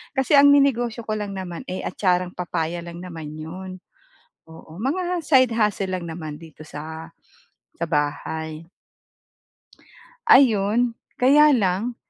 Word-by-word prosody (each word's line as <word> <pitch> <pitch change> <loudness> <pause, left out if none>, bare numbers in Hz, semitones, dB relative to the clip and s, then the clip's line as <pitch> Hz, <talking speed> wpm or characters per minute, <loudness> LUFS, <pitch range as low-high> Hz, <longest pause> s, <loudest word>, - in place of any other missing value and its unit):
Kasi 265 +1 +1
ang 285 0 +8
ninegosyo 245 -5 +2
ko 215 - -2
lang 205 -1 -5
naman, 180 -3 -6
eh, 185 - -4
atcharang 180 -1 0
papaya 175 -1 -3
lang 170 0 -9
naman 165 -4 -8
'yon, 185 +4 -8 0.7
oo. 160 0 -13
Mga 350 +7 -1
side 260 -5 +4
hustle 210 -3 0
lang 180 -2 -5
naman 155 -2 -7
dito 160 -2 -14
sa 160 +2 -8 0.7
sa 170 - -2
bahay. 155 +1 -3 1.6
Ayun, 235 - +4 0.2
kaya 295 +4 +5
lang, 210 +3 0
185 Hz, 125 wpm, -23 LUFS, 165-245 Hz, 1.6 s, ang